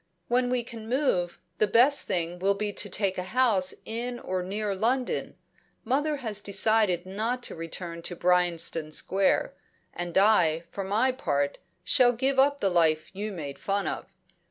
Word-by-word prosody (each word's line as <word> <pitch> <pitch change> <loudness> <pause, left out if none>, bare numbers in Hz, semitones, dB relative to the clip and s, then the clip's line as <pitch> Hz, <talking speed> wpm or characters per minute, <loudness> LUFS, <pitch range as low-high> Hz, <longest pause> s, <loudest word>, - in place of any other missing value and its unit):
"When 245 +1 +2
we 250 -1 0
can 225 -1 -10
move, 185 -10 0 0.2
the 215 - +3
best 250 +7 +4
thing 175 0 -2
will 195 +2 +2
be 205 0 -3
to 205 - -2
take 190 -1 -1
a 180 +3 -6
house 210 -8 +3
in 240 +2 -4
or 185 -4 -3
near 200 +3 -3
London. 245 +6 -1 0.5
Mother 295 +4 0
has 210 -2 -2
decided 200 -3 +2
not 225 +6 -3
to - - -1
return 170 +1 -6
to 175 - -4
Bryanston 170 -3 +1
Square, 195 +4 +1 0.4
and 175 0 -3
I, 180 -6 +4
for 195 - -4
my 215 +7 +2
part, 145 - -1 0.2
shall 250 -3 +4
give 265 +3 0
up 280 +1 +3
the 195 - +3
life 160 -3 +2
you 210 +2 -4
made 145 -7 -7
fun 200 0 -1
of. - - -4
200 Hz, 165 wpm, -27 LUFS, 175-240 Hz, 0.5 s, best